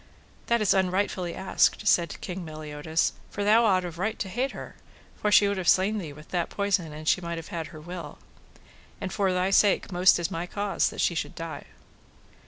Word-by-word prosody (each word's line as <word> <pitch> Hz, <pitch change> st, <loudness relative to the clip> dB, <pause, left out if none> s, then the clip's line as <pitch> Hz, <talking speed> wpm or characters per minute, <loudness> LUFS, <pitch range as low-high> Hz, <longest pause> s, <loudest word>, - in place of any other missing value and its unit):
That 235 Hz, -1 st, +2 dB
is 210 Hz, -, +4 dB
unrightfully 185 Hz, -2 st, 0 dB
asked, 190 Hz, +2 st, +1 dB
said 170 Hz, -4 st, +2 dB
King 185 Hz, -1 st, -5 dB
Meliodas, 155 Hz, 0 st, -2 dB, 0.2 s
for 205 Hz, -, -4 dB
thou 220 Hz, +3 st, +5 dB
ought 185 Hz, -4 st, +3 dB
of 170 Hz, -1 st, -7 dB
right 215 Hz, +4 st, -1 dB
to 195 Hz, -, -4 dB
hate 250 Hz, +8 st, -1 dB
her, -, -, -9 dB, 0.5 s
for 210 Hz, -, +1 dB
she 205 Hz, +1 st, +6 dB
would 200 Hz, 0 st, -1 dB
have 185 Hz, -2 st, -3 dB
slain 205 Hz, +3 st, +3 dB
thee 165 Hz, -6 st, -6 dB
with 150 Hz, +2 st, -14 dB
that 175 Hz, -2 st, -1 dB
poison 200 Hz, -5 st, 0 dB
an 155 Hz, +1 st, -9 dB
she 180 Hz, -, +2 dB
might 170 Hz, -1 st, -4 dB
have 165 Hz, -, -8 dB
had 165 Hz, -2 st, -4 dB
her 155 Hz, -, -11 dB
will; 170 Hz, -1 st, -8 dB, 0.8 s
and 190 Hz, -, -4 dB
for 195 Hz, -3 st, +1 dB
thy 185 Hz, +1 st, 0 dB
sake 200 Hz, 0 st, +3 dB
most 180 Hz, +1 st, +5 dB
is 170 Hz, -1 st, -2 dB
my 170 Hz, +2 st, -3 dB
cause 205 Hz, +1 st, 0 dB
that -, -, -4 dB
she -, -, +2 dB
should 165 Hz, -, -4 dB
die. 165 Hz, -1 st, -7 dB
180 Hz, 205 wpm, -27 LUFS, 165-200 Hz, 0.8 s, she